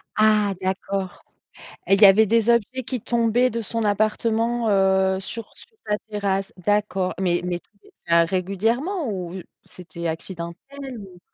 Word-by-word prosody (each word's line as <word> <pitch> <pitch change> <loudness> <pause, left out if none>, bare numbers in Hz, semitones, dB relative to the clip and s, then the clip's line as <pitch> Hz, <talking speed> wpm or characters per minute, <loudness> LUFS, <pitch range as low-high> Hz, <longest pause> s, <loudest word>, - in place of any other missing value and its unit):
Ah! 215 -2 +3
D'accord 190 0 -3 0.6
et 195 - +5
il 200 - 0
y - - +12
avait 210 +3 +6
des 230 +2 +3
objets 235 +3 +1
qui 255 -1 -3
tombaient 235 +2 +2
de 230 +1 -3
son 230 +1 -2
appartement, 225 +3 +1
heu, 190 -1 +3
sur 225 +3 -5
sur 460 - -15
ta 210 0 0
terrasse, 200 0 -2
d'accord 195 0 0
mais 175 -2 +1
mais 180 -1 -2
tout - - -31
était 170 0 +1
régulièrement 225 - -1
ou 185 -1 -5 0.2
c'était 170 -1 -7
accidentel 190 +12 -7
ou? 185 -4 -12
205 Hz, 150 wpm, -23 LUFS, 190-230 Hz, 0.6 s, y